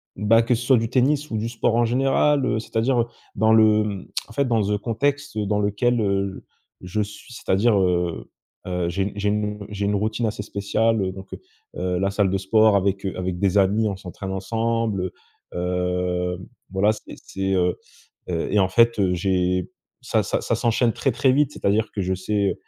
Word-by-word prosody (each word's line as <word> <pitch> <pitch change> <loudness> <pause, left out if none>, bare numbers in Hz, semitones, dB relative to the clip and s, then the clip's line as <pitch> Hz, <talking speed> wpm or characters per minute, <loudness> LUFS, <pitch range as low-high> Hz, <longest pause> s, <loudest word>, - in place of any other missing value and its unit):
Bah 115 +2 +4
que 120 +1 +1
ce 120 +2 -5
soit 130 -2 +5
du 115 0 -1
tennis 140 +4 +1
ou 110 - -1
du 110 - -2
sport 115 0 0
en 120 0 +3
général, 135 +3 +2
heu, 110 - 0
c'est-à-dire, 120 +3 0
heu, - - -1 0.3
dans 110 +2 +3
le 110 -1 +5
hem, 100 -3 -4 0.2
en 115 - -13
fait 140 +3 +1
dans 115 -3 +2
le 105 +1 0
contexte 140 +5 -2
dans 105 0 0
lequel, 110 +4 +1
heu, 100 -1 -1 0.4
je 90 +4 -2
suis, 105 +4 -8
c'est-à-dire, 105 0 +2
heu, 90 -2 0 0.4
heu, 90 -1 -1
j'ai 95 +3 -1
une 100 - -3
j'ai 100 0 0
une 105 -1 -2
j'ai 100 -1 -3
une 100 0 +1
routine 110 +3 -1
assez 105 -1 -2
spéciale, 110 +2 0
heu, 95 - -1
donc, 95 0 -11
heu, - - -7 0.4
heu, 90 0 -1
la 95 0 +1
salle 100 -1 +1
de 95 - +1
sport 110 +2 +4
avec, 100 0 0
heu, 95 - -3
avec 90 -1 -3
des 100 0 +2
amis 105 +3 +3
on 100 - -2
s'entraîne 95 +1 -7
ensemble 110 -2 -1 0.4
heu 90 0 -1 0.3
voilà 100 +3 +3
c'est 105 - -8
c'est, 95 0 -3
heu, 90 -1 +1 0.5
heu 85 -2 -2
et 105 - +3
en 95 -1 +3
fait, 115 +3 +4
heu, 90 -2 +2
j'ai, 90 0 0 0.3
ça - - +1
ça - - -1
ça - - 0
s'enchaîne 115 0 +1
très, 135 - 0
très 130 +2 +2
vite 145 0 +2
c'est-à-dire 105 +2 0
que 100 - -2
je 95 +1 0
sais, 100 +1 0
heu, - - -2
105 Hz, 205 wpm, -23 LUFS, 95-115 Hz, 0.5 s, soit